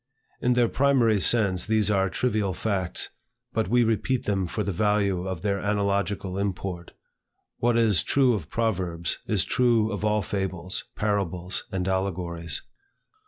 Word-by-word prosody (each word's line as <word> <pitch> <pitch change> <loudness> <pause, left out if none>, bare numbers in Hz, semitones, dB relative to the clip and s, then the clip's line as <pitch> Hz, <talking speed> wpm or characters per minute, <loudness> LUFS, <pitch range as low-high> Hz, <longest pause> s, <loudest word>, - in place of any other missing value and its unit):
In 125 - +3
their 120 -1 +3
primary 125 -5 +3
sense 100 -4 +3
these 110 -2 +2
are 95 -1 +2
trivial 105 -5 -1
facts, 95 -4 -1 0.4
but 110 - 0
we 120 +4 +3
repeat 115 +3 0
them 95 -3 0
for 105 +5 -2
the 100 - -2
value 100 -1 +1
of 95 -3 -4
their 100 -1 0
analogical 100 -1 -1
import. 95 -3 -4 0.7
What 120 0 +2
is 110 -8 +4
true 130 - +3
of 90 -8 -4
proverbs, 90 -7 -1
is - - +1
true 115 -3 +2
of 105 0 -4
all 105 -1 +1
fables, 95 -1 -3
parables, 95 -4 -2
and 95 -1 -2
allegories. 90 -3 -2
100 Hz, 145 wpm, -26 LUFS, 95-110 Hz, 0.7 s, is